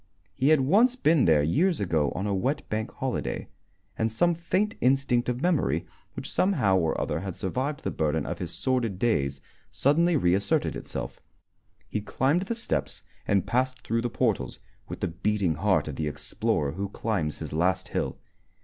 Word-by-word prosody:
He 135 - +2
had 155 -3 +5
once 220 - +4
been 160 - +3
there 75 -3 +5
years 165 - +2
ago 80 -7 +1
on 95 - -2
a 105 - 0
wet 130 +10 -1
Bank 110 +1 -2
Holiday, 120 - -3 0.5
and 110 0 0
some 170 +10 +3
faint 185 +6 0
instinct 125 -2 +2
of 125 +2 -2
memory 140 - +1 0.3
which - - -6
somehow 140 - +3
or 80 -2 0
other - - -1
had 95 -1 -5
survived 130 +9 -2
the - - -1
burden 80 0 0
of - - -4
his - - -4
sordid 125 -7 -1
days 70 - 0 0.3
suddenly 165 +5 +3
reasserted 100 -2 +1
itself. - - -6 0.7
He 105 - -2
climbed 145 - +1
the 235 - -1
steps 230 - -2 0.2
and 100 -2 +2
passed 130 +1 0
through 115 +1 0
the 120 - -1
portals 105 - 0 0.3
with - - -7
the - - +1
beating 95 0 0
heart 85 -1 +1
of 75 - -5
the 75 - -1
explorer 75 -1 -1
who 100 +4 -4
climbs 95 -8 -2
his 80 -2 -6
last 95 +4 +1
hill. - - -2
110 Hz, 175 wpm, -27 LUFS, 85-140 Hz, 0.7 s, had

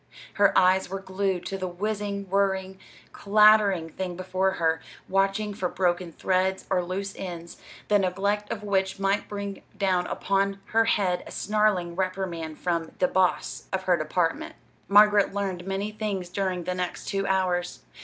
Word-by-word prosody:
Her 200 -1 +3
eyes 185 0 +4
were 195 +1 -4
glued 190 -1 -2
to 195 +1 -4
the 185 - -2
whizzing, 200 +2 -3
whirring, 190 -1 0 0.3
clattering 205 -5 +4
thing 180 0 -4
before 185 +1 0
her, 160 -1 0 0.3
watching 195 +2 +1
for 185 -2 -2
broken 175 -1 0
threads 190 +2 0
or 180 -2 +2
loose 195 +3 -4
ends, 170 -2 -7 0.3
the 205 -1 +4
neglect 200 +3 -1
of 210 -2 -4
which 190 -2 0
might 195 +1 0
bring 200 -1 -5 0.2
down 185 -3 +1
upon 195 0 0
her 225 +1 +4
head 185 -5 +1
a - - -9
snarling 205 -5 +1
reprimand 180 -4 -3
from 170 -2 -2
"de 180 - +3
boss" 185 -1 0
of 190 0 -1
her 185 -1 +3
department. 165 +1 -1 0.3
Margaret 205 0 +5
learned 190 -3 -3
many 195 +2 -2
things 205 -4 -3
during 185 -1 -2
the 180 +2 -2
next 180 -1 -4
two 195 0 -1
hours. 180 - 0
190 Hz, 155 wpm, -26 LUFS, 180-200 Hz, 0.3 s, Margaret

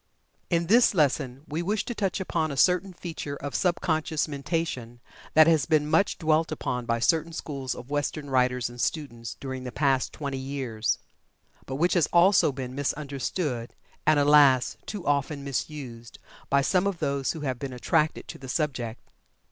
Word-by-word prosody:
In 170 -1 +1
this 230 +3 +5
lesson 135 -4 +1
we 155 +3 -2
wish 200 +4 -1
to 240 - -3
touch 200 -3 -1
upon 165 -4 -1
a 140 - -5
certain 180 +5 +3
feature 165 -5 -6
of 145 0 -6
sub 180 -2 +1
conscious 160 -2 0
mentation 140 -5 -3 0.4
that 155 0 +9
has 160 -4 +3
been 155 -2 +2
much 160 +6 +2
dwelt 160 -1 +1
upon 125 -5 -3
by 115 - +1
certain 160 +7 +1
schools 135 -6 -4
of 125 +3 -10
western 145 +1 -2
writers 125 -2 +2
and 120 0 -7
students 120 -7 -3
during 130 -1 -5
the 125 - -5
past 135 -1 +1
twenty 140 -3 -4
years, 130 -5 -2 0.7
but 130 - -4
which 175 +6 +2
has 175 -5 +3
also 175 -2 +5
been 130 -2 -6
misunderstood, 140 -2 -3 0.3
and, 155 -1 +5
alas, 145 -3 +5
too 205 -5 -5
often 140 0 0
misused, 130 -4 -5 0.3
by 140 0 +3
some 185 +6 +2
of 195 -3 -2
those 140 -3 -1
who 160 - -7
have 130 -4 -2
been 135 -2 -5
attracted 155 +5 0
to - - -8
the 135 -1 -9
subject. 125 -7 -2
145 Hz, 170 wpm, -27 LUFS, 130-165 Hz, 0.7 s, that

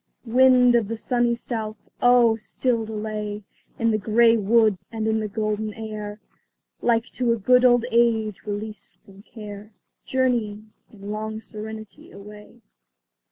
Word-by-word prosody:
Wind 250 +1 +5
of 235 -3 +2
the 230 +1 -4
sunny 240 0 +1
south! 220 -2 -5 0.2
oh, 245 -2 +5
still 230 +1 -1
delay 210 -1 -5 0.3
In 230 0 +1
the 215 - 0
gay 225 +3 +4
woods 215 -2 +2
and 220 -1 -3
in 220 0 +1
the 215 - -2
golden 215 0 -3
air, 215 -1 -7 0.6
Like 230 -1 +2
to 245 -2 +1
a - - -2
good 250 +4 +4
old 245 -1 +5
age 225 -3 +2
released 210 0 -6
from 195 0 -16
care, 210 -1 -11 0.3
Journeying, 220 -5 -1 0.2
in 205 -1 -9
long 215 +1 -4
serenity, 220 -1 -9
away. 210 +3 -14
220 Hz, 140 wpm, -23 LUFS, 210-235 Hz, 0.6 s, Wind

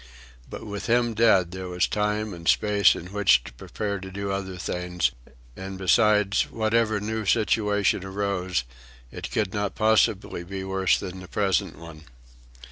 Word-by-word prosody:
But - - -8
with 100 -1 -6
him 120 0 +2
dead 100 -6 +3
there 95 0 -6
was 90 0 +1
time 105 0 -1
and 85 -1 -9
space 105 -2 +4
in 90 +3 -9
which 105 -3 +4
to - - -11
prepare 100 - -4
to 95 0 -8
do 100 +1 -4
other 95 -1 -4
things; 90 0 -1 0.4
and 95 0 -7
besides, 105 +1 +3
whatever 110 -1 +1
new 110 +2 -3
situation 105 -2 +1
arose, 95 -6 -2 0.5
it - - -7
could 95 - -1
not 105 -1 -2
possibly 110 -4 +1
be 95 +2 -6
worse 95 -1 +1
than 95 -1 -7
the 90 - -10
present 95 -4 0
one. 80 -1 -12
100 Hz, 155 wpm, -25 LUFS, 95-105 Hz, 0.5 s, space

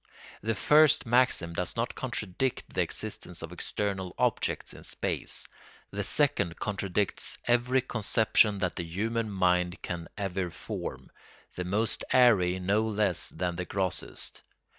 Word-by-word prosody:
The 110 +1 -1
first 150 +3 +5
maxim 120 -8 +2
does 90 +1 -2
not 115 +1 -1
contradict 125 0 -2
the - - +2
existence 85 -2 -4
of 85 - -6
external 95 +1 -3
objects - - 0
in - - -12
space; - - -2 0.4
the - - -2
second 85 -1 +1
contradicts 100 -1 0
every 120 +2 +3
conception 110 -3 +2
that 90 -2 -1
the 85 - -1
human 110 +7 -2
mind 90 -2 +1
can 85 -1 -4
ever 95 -3 -2
form, - - -6 0.4
the 90 - -4
most 105 +5 0
airy 100 -8 +5
no 100 +4 +2
less 105 -5 +1
than 90 -2 -3
the 90 - -3
grossest. 95 0 -2
100 Hz, 135 wpm, -29 LUFS, 90-115 Hz, 0.4 s, first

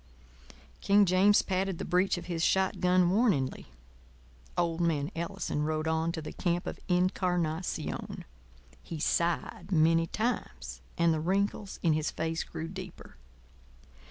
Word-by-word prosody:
King 200 0 +5
James 190 +3 +4
patted 190 -1 -1
the - - -4
breech 180 +2 +2
of 175 - -7
his 165 -2 -2
shot 190 +1 +2
gun 180 -1 +4
warningly. 190 - +1 0.9
Old 170 -1 0
man 150 -4 0
Ellison 165 -3 -3
rode 155 +1 -1
on 160 +1 +1
to 160 - -5
the - - -6
camp 175 -1 -1
of - - -5
Incarnación. 180 -2 -1 0.6
He 165 - -7
sighed 170 +3 -1
many 165 0 +4
times, 230 +7 -3 0.2
and 170 -1 +4
the 155 - -1
wrinkles 195 +3 -1
in 165 -3 +4
his 155 0 0
face 160 +1 -2
grew 160 - -6
deeper. 185 - -9
175 Hz, 135 wpm, -30 LUFS, 160-185 Hz, 0.9 s, King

